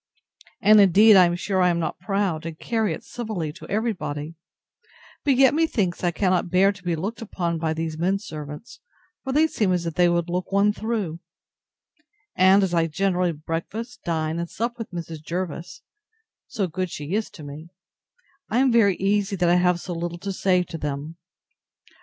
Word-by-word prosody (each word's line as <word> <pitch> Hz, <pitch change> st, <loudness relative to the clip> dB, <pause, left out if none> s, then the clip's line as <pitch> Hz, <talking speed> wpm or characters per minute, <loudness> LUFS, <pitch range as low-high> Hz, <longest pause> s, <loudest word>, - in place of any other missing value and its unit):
And 210 Hz, +1 st, +7 dB
indeed 200 Hz, +3 st, +7 dB
I 185 Hz, -2 st, +8 dB
am 175 Hz, -, -1 dB
sure 190 Hz, +1 st, -1 dB
I 180 Hz, -, +4 dB
am 170 Hz, -, +1 dB
not 170 Hz, -, -3 dB
proud, 185 Hz, -3 st, -1 dB
and 165 Hz, -1 st, -7 dB
carry 220 Hz, -2 st, -1 dB
it 160 Hz, -, -5 dB
civilly 215 Hz, -11 st, -4 dB
to 185 Hz, -, -12 dB
every 220 Hz, +3 st, 0 dB
body; 150 Hz, -2 st, -5 dB, 0.9 s
but 275 Hz, -2 st, +3 dB
yet, 265 Hz, +1 st, +5 dB
methinks, 225 Hz, -, 0 dB
I 175 Hz, -, +3 dB
cannot 185 Hz, 0 st, 0 dB
bear 190 Hz, +3 st, +4 dB
to 200 Hz, -2 st, -13 dB
be 175 Hz, -2 st, -1 dB
looked 205 Hz, +8 st, -4 dB
upon 170 Hz, -6 st, -3 dB
by 160 Hz, -1 st, -1 dB
these 160 Hz, -1 st, -4 dB
men 185 Hz, +3 st, +1 dB
servants, 150 Hz, -2 st, -9 dB, 0.4 s
for 265 Hz, -, -3 dB
they 300 Hz, +4 st, +4 dB
seem 210 Hz, -11 st, 0 dB
as 175 Hz, -1 st, 0 dB
if 165 Hz, -, -3 dB
they 175 Hz, +2 st, +4 dB
would 170 Hz, 0 st, 0 dB
look 180 Hz, +2 st, -3 dB
one 200 Hz, +1 st, +3 dB
through; 210 Hz, -8 st, -3 dB, 1.2 s
and, 190 Hz, +2 st, +5 dB
as 185 Hz, -2 st, -1 dB
I 165 Hz, -1 st, +2 dB
generally 180 Hz, +1 st, 0 dB
breakfast, 170 Hz, +10 st, -5 dB
dine, 160 Hz, -1 st, -1 dB
and 170 Hz, 0 st, -4 dB
sup, 235 Hz, +2 st, -3 dB
with 225 Hz, -, -5 dB
Mrs. 165 Hz, -3 st, -7 dB
Jervis, 170 Hz, +1 st, -5 dB, 0.6 s
(so 210 Hz, -6 st, -2 dB
good 185 Hz, +1 st, -3 dB
she 150 Hz, +2 st, -6 dB
is 215 Hz, +1 st, -1 dB
to 155 Hz, -, -12 dB
me,) 145 Hz, +3 st, -9 dB, 0.8 s
I 225 Hz, -, 0 dB
am 260 Hz, 0 st, +4 dB
very 210 Hz, -5 st, +4 dB
easy 200 Hz, +1 st, 0 dB
that 175 Hz, -2 st, +1 dB
I 175 Hz, -, +5 dB
have 180 Hz, -1 st, +2 dB
so 175 Hz, -, -6 dB
little 170 Hz, 0 st, -4 dB
to 195 Hz, +2 st, -5 dB
say 180 Hz, -1 st, +2 dB
to 165 Hz, -2 st, -8 dB
them. 150 Hz, +3 st, -5 dB
180 Hz, 190 wpm, -24 LUFS, 165-205 Hz, 1.2 s, I